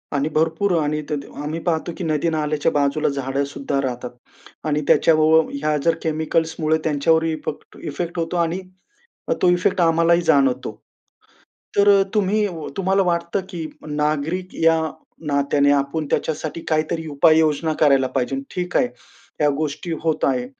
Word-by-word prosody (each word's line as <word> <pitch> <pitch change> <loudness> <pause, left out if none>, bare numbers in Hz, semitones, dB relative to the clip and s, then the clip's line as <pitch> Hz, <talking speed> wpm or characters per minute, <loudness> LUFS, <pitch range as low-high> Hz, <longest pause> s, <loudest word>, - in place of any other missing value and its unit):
आणि 145 +2 0
भरपूर 165 +6 +1
आणि 150 +1 -1
ते 150 - 0
ते - - -14 0.2
आम्ही 155 +3 -3
पाहतो 170 0 -1
की - - -5
नदी 155 0 0
नाल्याच्या 155 -2 0
बाजूला 145 +1 +1
झाडं 140 0 -2
सुद्धा 140 0 -3
राहतात 125 -2 -4 0.6
आणि 150 0 +1
त्याच्याबरोबर 160 0 +4
ह्या 150 +2 0
जर 165 -1 +3
केमिकल्स 160 0 0
मुळे 155 0 +2
त्यांच्यावर 160 +2 +2
ईपक्ट 155 -2 -5
इफेक्ट 170 +4 -4
होतो 165 +1 -2
आणि 170 +1 0 0.8
तो - - +5
इफेक्ट 175 +1 +1
आम्हालाही 170 0 +4
जाणवतो. 140 -6 +2 1.0
तर 200 0 +5
अ, - - +5
तुम्ही 210 +1 +2
व 160 -3 -6
तुम्हाला 195 +1 +2
वाटतं 170 +1 0
की 170 -4 -5 0.2
नागरिक 150 +5 -2
या 165 0 +5 0.5
नात्याने 140 0 +2
आपण 145 +2 0
त्याच्यासाठी 155 +1 -2
काहीतरी 160 +1 -1
उपाययोजना 155 +1 +3
करायला 135 -3 +4
पाहिजे, 135 0 0
ठीक 180 0 -3
आहे. - - +3 0.5
या 150 - +4
गोष्टी 155 +3 -3
होत 160 -1 0
आहे. 125 -2 +1
155 Hz, 150 wpm, -21 LUFS, 145-165 Hz, 1.0 s, तो